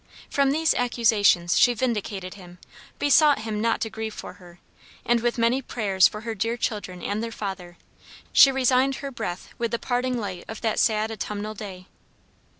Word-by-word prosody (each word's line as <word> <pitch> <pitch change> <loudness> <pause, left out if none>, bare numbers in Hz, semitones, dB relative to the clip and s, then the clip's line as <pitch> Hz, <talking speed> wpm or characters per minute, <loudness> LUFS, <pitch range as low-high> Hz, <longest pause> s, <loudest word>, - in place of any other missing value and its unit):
From 280 -1 +2
these 315 +3 +2
accusations 220 -8 +2
she 245 -1 +5
vindicated 210 -6 -3
him, 180 -3 -13 0.4
besought 290 -2 +4
him 215 -1 -3
not 230 0 +1
to 225 - -1
grieve 220 -1 -5
for - - -8
her, 175 -1 -15 0.5
and 240 0 +3
with 240 +1 -1
many 235 +3 +2
prayers 200 -7 +2
for 210 - -8
her 230 0 -4
dear 225 +3 -2
children 185 -6 -4
and 205 +2 -2
their 230 - -4
father, 190 -5 -6 0.6
she 275 - +8
resigned 265 0 +2
her 275 0 -6
breath 180 -7 -6
with 235 -1 0
the 235 - -1
parting 250 +1 -1
light 195 -6 -5
of 220 - -8
that 225 -2 0
sad 220 -1 +1
autumnal 210 0 -5
day. 195 -3 -9
220 Hz, 175 wpm, -24 LUFS, 200-245 Hz, 0.6 s, she